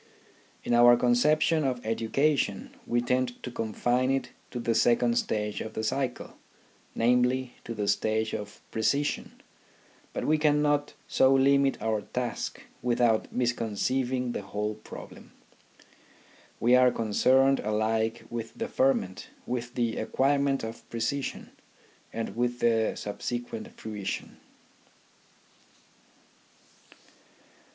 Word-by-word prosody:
In - - -1
our 120 0 +7
conception 150 +6 +3
of 125 -4 -2
education 115 0 0 0.2
we 120 0 +1
tend 125 0 -1
to 125 - -5
confine 120 +3 0
it 135 0 -1 0.2
to 125 - -5
the 115 -1 0
second 120 +1 +3
stage 105 -1 -2
of 110 - -6
the 110 - -2
cycle; 125 +2 -2 0.6
namely, 125 +2 +2
to 115 - -5
the 105 -1 -2
stage 110 +2 +1
of 105 0 -6
precision. 140 +6 -1 0.7
But - - -3
we 155 0 +3
cannot 145 -1 +2
so 130 - +4
limit 140 0 +3
our 110 -1 0
task 125 +2 -4 0.2
without 120 -2 +2
misconceiving 125 +1 -1
the - - -3
whole 105 +2 -3
problem. 105 0 -12 1.3
We 120 +2 +5
are 125 0 +6
concerned 130 +5 +3
alike 110 +1 0
with 115 -1 -5
the 230 - -2
ferment, 130 - 0 0.2
with 125 0 -4
the 120 -2 0
acquirement 140 0 +1
of 115 +1 -7
precision, 120 +4 -3 0.6
and 115 0 -4
with 120 +1 0
the 115 -1 +2
subsequent 120 - -5
fruition. 105 -3 -5
120 Hz, 110 wpm, -28 LUFS, 110-130 Hz, 1.3 s, our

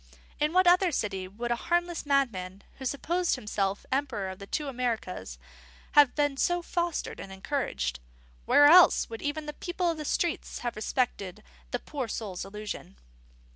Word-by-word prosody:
In 300 +1 +2
what 370 +2 +4
other 355 +1 +5
city 195 -8 -2
would 235 +5 -5
a - - +3
harmless 345 +3 -1
madman 200 -9 0 0.2
who 265 - -6
supposed 340 +7 0
himself 200 -2 -2
emperor 260 -8 -1
of 190 - -8
the 200 - -9
two 300 +6 -2
Americas 230 - -3 0.5
have 290 -3 +6
been 290 -2 +1
so 350 +4 +1
fostered 345 -2 -2
and 195 - -8
encouraged? 190 - -2 0.5
Where 290 - +6
else 335 -4 +7
would 225 - -6
even 300 +1 -2
the 300 - -5
people 350 +2 -1
of 330 - -5
the 305 - -5
streets 340 +3 -1
have 240 - -2
respected 215 -3 -2 0.3
the 245 - -1
poor 265 0 -5
soul's 205 -4 -4
illusion? 210 - -7
260 Hz, 165 wpm, -29 LUFS, 200-310 Hz, 0.5 s, else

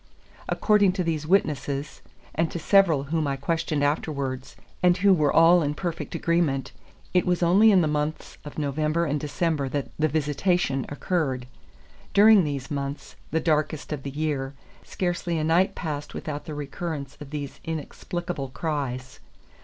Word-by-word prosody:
According 205 -3 +3
to 185 -1 -1
these 155 -2 -2
witnesses, 150 -5 0 0.3
and 165 +1 +1
to - - -5
several 170 -4 +4
whom 155 +1 -1
I 140 - 0
questioned 150 +1 -1
afterwards, 140 -3 -2 0.3
and 180 0 +4
who 195 +1 +5
were 150 -5 +2
all 170 +2 +6
in 145 -1 -1
perfect 175 0 -4
agreement, 170 -6 0 0.4
it 180 - +4
was 180 0 +1
only 200 +6 +6
in 190 -3 +5
the 160 - +2
months 150 +1 -3
of 145 - -10
November 155 +3 0
and 145 -1 -1
December 150 -1 -1
that 140 0 -3
"the 155 - +3
visitation" 150 -1 0
occurred. 145 -5 -1 0.7
During 210 -1 +7
these 140 -3 -4
months, 140 0 -4
the 160 - +1
darkest 155 -2 0
of 145 - -4
the 140 - -5
year, 140 -2 -2 0.3
scarcely 175 -2 -2
a 155 - -1
night 165 +4 +2
passed 150 -3 -5
without 150 -1 -5
the 155 - -6
recurrence 145 0 -5
of 145 - -8
these 145 -2 -6
inexplicable 165 -1 -4
cries. 130 -4 -4
155 Hz, 155 wpm, -25 LUFS, 140-170 Hz, 0.7 s, During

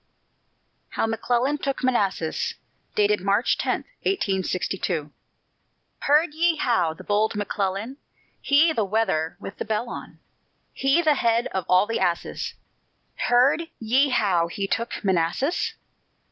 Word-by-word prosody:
HOW - - +1
McCLELLAN 245 +5 0
TOOK 275 -2 -3
MANASSAS 200 -10 0 0.6
[March 200 +5 +2
10, - - -1 0.2
1862] 185 - -1 0.9
Heard 300 +2 +3
ye 335 +1 +2
how 200 - +1
the - - -12
bold 210 +1 +1
McClellan, 205 +4 -2 0.4
He, 310 +3 +4
the 225 - +1
wether 190 -6 0
with 200 - -9
the - - -3
bell 220 +2 -2
on; - - -8 0.6
He, 275 +6 +2
the 310 -2 +4
head 235 -3 +1
of 190 -2 -2
all 185 +2 +5
the 225 - -2
asses 175 -2 -2 0.7
Heard 270 +7 +3
ye 255 +6 +2
how 190 -9 +2
he 195 +4 -3
took 230 +4 -3
Manassas? 190 - 0
225 Hz, 120 wpm, -24 LUFS, 190-270 Hz, 0.9 s, all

